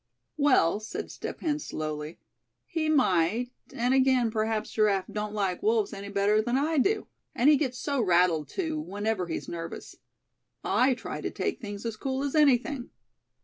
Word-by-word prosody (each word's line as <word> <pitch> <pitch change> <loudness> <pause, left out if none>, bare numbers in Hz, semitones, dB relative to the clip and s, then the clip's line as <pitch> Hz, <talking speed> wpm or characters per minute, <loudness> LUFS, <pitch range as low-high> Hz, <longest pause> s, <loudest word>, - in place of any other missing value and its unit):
"Well," 260 - +3
said 215 - -6
Step - - -7
Hen, 300 -2 0
slowly; 155 - -5 0.5
"he 320 -2 -1
might; 240 - +2 0.2
and 245 +2 0
again, 260 -3 +3
perhaps 220 0 -1
Giraffe 205 -3 +2
don't 210 0 -4
like 195 -3 -1
wolves 430 -1 +1
any 200 0 -7
better 200 +2 +2
than 240 +3 0
I 300 +2 +1
do. 415 +10 +1 0.3
And 270 +5 +5
he - - +7
gets 260 -3 -1
so 280 -2 -1
rattled 175 -6 +3
too, 320 -5 -2
whenever 205 - -2
he's 165 - -4
nervous. 165 -1 -7 0.7
I 255 +1 +3
try - - -6
to - - -2
take 395 -8 -3
things 205 -1 -6
as 225 -2 -3
cool 265 +3 -2
as 285 - -2
anything. 280 -3 +2
235 Hz, 165 wpm, -28 LUFS, 200-285 Hz, 0.7 s, he